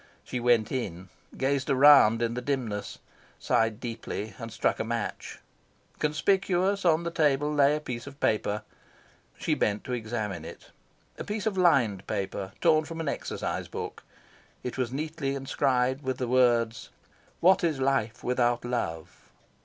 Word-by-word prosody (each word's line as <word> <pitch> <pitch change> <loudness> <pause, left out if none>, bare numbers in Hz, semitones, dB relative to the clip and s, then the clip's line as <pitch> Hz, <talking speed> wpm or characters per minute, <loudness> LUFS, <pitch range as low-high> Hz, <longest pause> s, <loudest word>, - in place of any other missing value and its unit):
She 125 - -4
went 120 -2 +3
in, 95 -8 -4 0.3
gazed 135 +1 0
around 135 -4 +7
in 115 0 0
the 125 - -3
dimness, 120 -6 -3 0.4
sighed 115 -1 +1
deeply, 115 -3 -5
and 115 -1 -6
struck - - 0
a - - 0
match. 115 -1 -4 0.6
Conspicuous 190 +5 +1
on 165 -1 +4
the 170 - -3
table 150 -2 +2
lay 145 0 +4
a - - -2
piece 125 -3 -6
of 140 0 -11
paper. 105 -1 0 0.7
She - - 0
bent 105 0 0
to 125 - -4
examine 110 -7 -3
it. - - -11 0.5
A - - -3
piece 210 0 -4
of 220 -3 0
lined 130 - +3
paper, 100 -2 -3
torn 155 -2 +4
from 165 +1 -7
an 160 -3 -1
exercise - - -3
book, - - -6 0.6
it 125 - -4
was 125 -2 -2
neatly 150 0 -3
inscribed 130 -1 0
with 130 -2 -2
the 125 - -2
words 120 -2 +2 0.5
"What 185 +2 +5
is 160 -5 +1
Life 125 -4 0
without 120 -1 +1
Love?" 90 -9 -4
125 Hz, 155 wpm, -28 LUFS, 115-150 Hz, 0.7 s, around